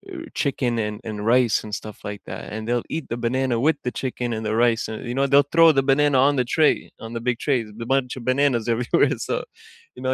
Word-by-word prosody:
uh, - - -6 0.2
chicken 135 -4 0
and 105 - -5
and 110 -1 -4 0.2
rice 125 -3 +3
and 105 - -9
stuff 105 -1 -10
like 100 -1 -7
that, - - -6
and 110 - -4
they'll 120 0 -1
eat 160 -3 -4
the 115 - -3
banana 130 +1 0
with 160 -1 +3
the 125 - 0
chicken 125 -2 -3
and 110 0 -5
the 110 0 -1
rice, 115 -1 +1
and, 110 - -5
you 120 - -3
know, 140 0 +2
they'll 140 +1 +4
throw 165 0 +7
the 135 -1 +2
banana 145 0 +3
on 145 - +2
the 125 - +1
tray, 155 -2 +4 0.3
on 115 - -8
the 115 - -3
big 120 -2 +1
trays, 130 -6 +1
the 115 - -5
bunch 130 -2 0
of 125 - -7
bananas 130 -3 +2
everywhere 115 +1 +2
so, - - 0 0.6
you 125 - -11
know, 130 - +1
125 Hz, 250 wpm, -23 LUFS, 115-140 Hz, 0.6 s, throw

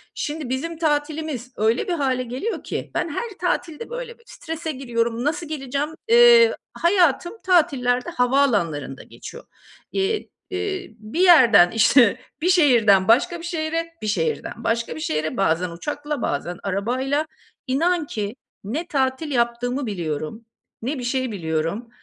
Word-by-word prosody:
şimdi 295 -3 -4
bizim 315 +6 -3
tatilimiz 295 -4 -2
öyle 225 - +1
bir 355 - 0
hâle 260 -5 0
geliyor 255 - -4
ki - - -5
ben 335 - 0
her 470 +10 -3
tatilde 355 +3 -2
böyle 485 -1 -6
strese 325 -6 -6
giriyorum, 235 -3 -2
nasıl 315 +3 -1
geleceğim? 280 0 -3 0.2
Eee, 475 0 +7 0.2
hayatım 350 +2 +2
tatillerde 260 -9 +2
havaalanlarında 215 - 0
geçiyor. - - -11 0.5
Eee, 395 +3 -1 0.2
eee, 380 - -3
bir 215 +10 -6
yerden 240 - +7
işte, 230 0 +4 0.2
bir 360 - +2
şehirden 230 - +5
başka 340 +10 +3
bir 335 - -8
şehre, 330 0 -2
bir 215 - -4
şehirden 455 - -2
başka 230 -7 -1
bir 155 - -7
şehre, 155 +1 -2
bazen 180 -1 +1
uçakla, 295 - -4
bazen 175 +5 -3
arabayla, 255 +10 -1 0.4
inan 330 +5 +1
ki 210 +1 -4 0.3
ne 290 - -4
tatil 270 +2 -1
yaptığımı 245 +2 0
biliyorum, 170 +3 -4 0.4
ne 260 +4 -3
bir - - -5
şey 255 0 -1
biliyorum. 165 +5 -3
265 Hz, 135 wpm, -22 LUFS, 225-330 Hz, 0.5 s, Eee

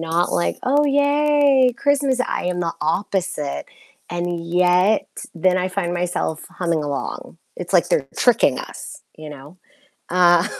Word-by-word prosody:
not 165 +1 -1
like, 85 0 -1
"Oh, 285 +3 +3
yay, 285 -2 +3
Christmas," 280 -2 +1
I 255 - -2
am 180 0 -2
the 170 -2 -1
opposite, 165 - -2 0.4
and 175 -1 -3
yet, 180 +4 +2 0.3
then 185 +2 +2
I 185 0 0
find 180 -2 -2
myself 175 -2 -2
humming 170 -3 -2
along, 145 +3 -5 0.2
it's 180 +1 -7
like 175 -3 +3
they're 135 -2 0
tricking 245 -2 +3
us, - - -9
you 155 -1 -9
know, 145 +4 -12 0.5
uh, 175 0 +4
180 Hz, 140 wpm, -20 LUFS, 165-245 Hz, 0.5 s, uh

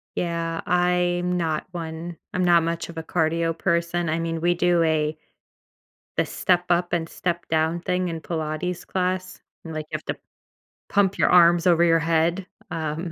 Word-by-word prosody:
Yeah, 165 -1 -2
I'm 180 0 +1
not 160 -3 -1
one 165 0 -6 0.2
I'm 185 - 0
not 170 -1 +5
much 165 +1 -2
of 170 - -10
a - - -3
cardio 165 0 0
person, 170 -1 0
I 160 +1 0
mean, 165 -1 -2
we 175 +1 +2
do 175 -1 +2
a 155 -1 +1 1.0
the - - +3
step-up-and-step-down 175 -2 0
thing 180 +1 -1
in 165 -1 -4
Pilates 160 +2 -3
class, 185 0 -2 0.2
and, 160 -1 -7
like, 155 -1 -4
you - - -1
have - - -13
to - - -3 0.7
pump 200 -1 +2
your - - +3
arms 175 -1 +6
over 170 -1 +5
your 165 -1 +4
head, 165 +3 +1 0.3
um, 160 +2 -3
170 Hz, 155 wpm, -24 LUFS, 165-175 Hz, 1.0 s, arms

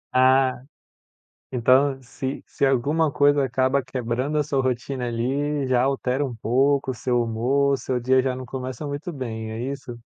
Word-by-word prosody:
Ah, 130 0 +4 0.9
então 130 +2 +3
se 130 +2 -5
se - - -2
alguma 145 +4 +2
coisa 145 0 +3
acaba 130 +2 +1
quebrando 130 +3 -2
a 150 - +1
sua 135 -2 0
rotina, 130 0 -2
ali, 135 +5 -1
já 125 -1 +2
altera 135 +1 0
um 125 -4 -5
pouco 135 +4 +1
o - - -8
seu 120 0 0
humor, 130 +5 +1
o - - +1
seu 130 -1 -2
dia 130 +2 +3
já 130 -1 -1
não 130 0 -7
começa 130 +3 -5
muito 145 +5 -5
bem, 110 -6 -5
é 110 - -5
isso? 130 -4 -8
130 Hz, 170 wpm, -24 LUFS, 125-140 Hz, 0.9 s, Ah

